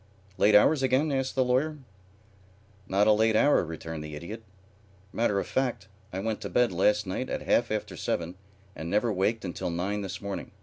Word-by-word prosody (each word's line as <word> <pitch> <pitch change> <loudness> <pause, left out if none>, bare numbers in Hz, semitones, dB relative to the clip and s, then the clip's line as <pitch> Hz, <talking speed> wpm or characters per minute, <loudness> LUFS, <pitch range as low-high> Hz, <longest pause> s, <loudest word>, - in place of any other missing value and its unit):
"Late 105 0 +5
hours 135 +8 +5
again?" 135 +4 +2
asked 135 -1 -1
the 130 -1 +2
Lawyer. 140 +5 +1 1.1
"Not 100 +2 +2
a 110 - +6
late 110 +1 +3
hour," 145 +1 +4
returned 80 -1 -6
the 75 -1 -7
Idiot. 85 +9 -7 0.7
"Matter 110 -3 +1
of - - -3
fact, 120 -7 -2 0.2
I 95 - -5
went 110 +2 -2
to - - -5
bed 125 -3 +2
last 105 +4 +2
night 95 +7 -3
at - - -3
half 120 - +2
after 110 -1 -3
seven 85 +1 -2 0.4
and 80 - -6
never 105 +4 +1
waked 105 +3 0
until 90 -1 -3
nine 95 +5 -2
this 95 -1 -5
morning. 100 -1 -6
105 Hz, 185 wpm, -28 LUFS, 95-125 Hz, 1.1 s, a